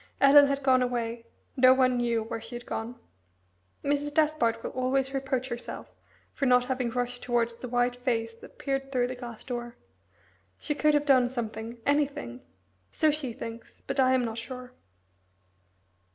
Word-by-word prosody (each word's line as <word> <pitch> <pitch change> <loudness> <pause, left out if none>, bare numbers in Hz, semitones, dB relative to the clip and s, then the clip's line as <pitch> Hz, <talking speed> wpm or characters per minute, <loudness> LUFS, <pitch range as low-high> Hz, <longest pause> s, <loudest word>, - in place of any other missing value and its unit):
Ellen 285 +1 +8
had 280 0 -1
gone 260 -1 +4
away 235 -2 -2 0.3
no 255 -1 +6
one 255 -1 +3
knew 235 -2 0
where 225 0 -5
she 240 - -8
had 240 - -7
gone. 230 +2 -4 0.9
Mrs. 290 +1 0
Despard 290 -7 +1
will - - -4
always 265 +1 0
reproach 265 -1 -2
herself 240 0 -7 0.4
for 275 - 0
not 250 0 +5
having 255 -1 -1
rushed 245 +1 -2
towards 235 -1 0
the 240 +2 -8
white 245 0 +1
face 230 -3 -1
that 230 - -15
peered 270 -1 -3
through 250 -2 +2
the 255 +1 -4
glass 240 -3 -8
door. 240 -1 -5 0.8
She 295 - -2
could 300 0 +3
have 295 0 +1
done 255 -3 +4
something 230 -1 -5
anything. 285 - 0 0.5
So 310 -1 +3
she 290 -4 -3
thinks, 230 -1 -9
but - - -3
I 260 0 +5
am 250 -1 +1
not 225 0 -4
sure. 250 +1 -8
250 Hz, 165 wpm, -28 LUFS, 235-270 Hz, 0.9 s, Ellen